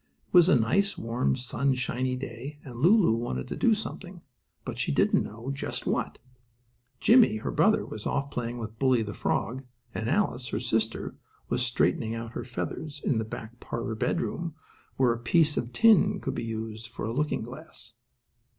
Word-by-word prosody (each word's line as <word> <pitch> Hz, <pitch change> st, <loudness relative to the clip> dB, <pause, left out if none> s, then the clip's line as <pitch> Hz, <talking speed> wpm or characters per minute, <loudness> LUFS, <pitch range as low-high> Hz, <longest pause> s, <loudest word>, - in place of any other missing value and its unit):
It -, -, -34 dB
was 175 Hz, -1 st, +7 dB
a -, -, +6 dB
nice, 165 Hz, -, +2 dB
warm, 115 Hz, -, 0 dB
sunshiny 130 Hz, 0 st, -1 dB
day, 130 Hz, +3 st, -7 dB
and 125 Hz, -4 st, -8 dB
Lulu 175 Hz, -, +5 dB
wanted 115 Hz, -, -2 dB
to -, -, -3 dB
do 230 Hz, -2 st, +4 dB
something, 190 Hz, -4 st, -7 dB, 0.4 s
but -, -, -5 dB
she -, -, 0 dB
didn't 70 Hz, -, +3 dB, 0.3 s
just 135 Hz, -, -4 dB
know -, -, +2 dB
what. -, -, -2 dB, 0.8 s
Jimmie, 235 Hz, -, +6 dB
her -, -, -3 dB
brother, -, -, +3 dB
was 105 Hz, -, -6 dB
off 140 Hz, 0 st, -1 dB
playing 120 Hz, 0 st, -3 dB
with 110 Hz, -1 st, -7 dB
Bully, 130 Hz, -4 st, +3 dB
the 105 Hz, -1 st, -5 dB
frog, 120 Hz, +8 st, -1 dB, 0.3 s
and 110 Hz, +2 st, -2 dB
Alice, 135 Hz, -8 st, +1 dB
her -, -, -2 dB
sister, 115 Hz, -2 st, -1 dB, 0.3 s
was 125 Hz, +1 st, 0 dB
straightening 115 Hz, -1 st, +1 dB
out 115 Hz, 0 st, -5 dB
her -, -, -5 dB
feathers 145 Hz, +4 st, -5 dB
in 120 Hz, -, +2 dB
the 110 Hz, -, -2 dB
back 115 Hz, +2 st, -8 dB
parlor 115 Hz, 0 st, -4 dB
bedroom, 165 Hz, +7 st, -2 dB, 0.4 s
where 125 Hz, -3 st, +4 dB
a 115 Hz, -, -6 dB
piece 150 Hz, +6 st, +3 dB
of 120 Hz, -, -2 dB
tin 220 Hz, -, +5 dB
could -, -, -3 dB
be -, -, -3 dB
used 110 Hz, 0 st, -5 dB
for 115 Hz, -, -6 dB
a 115 Hz, -, -2 dB
looking 150 Hz, +4 st, 0 dB
glass. 115 Hz, -1 st, -9 dB
125 Hz, 180 wpm, -28 LUFS, 115-150 Hz, 0.8 s, was